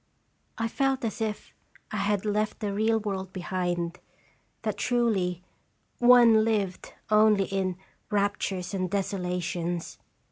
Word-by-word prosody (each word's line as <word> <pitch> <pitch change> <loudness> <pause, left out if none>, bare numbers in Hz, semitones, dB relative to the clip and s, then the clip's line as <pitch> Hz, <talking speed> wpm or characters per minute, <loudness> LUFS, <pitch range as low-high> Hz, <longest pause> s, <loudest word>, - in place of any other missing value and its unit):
I 225 -1 0
felt 270 +1 0
as 225 +1 -4
if 215 -1 -3 0.4
I 215 - -2
had 205 0 0
left 210 0 0
the 205 -2 -2
real 220 +2 +2
world 190 -3 -4
behind; 175 -2 -2 0.6
that, - - -2
truly, 200 -8 0 0.6
one 240 -3 +7
"lived" 205 -5 -1 0.2
only 215 -1 +5
in 190 -2 -2 0.3
"raptures 200 -2 -1
and 185 -2 -1
deso 195 0 -1
lations." 175 -1 -3
200 Hz, 120 wpm, -27 LUFS, 185-220 Hz, 0.6 s, one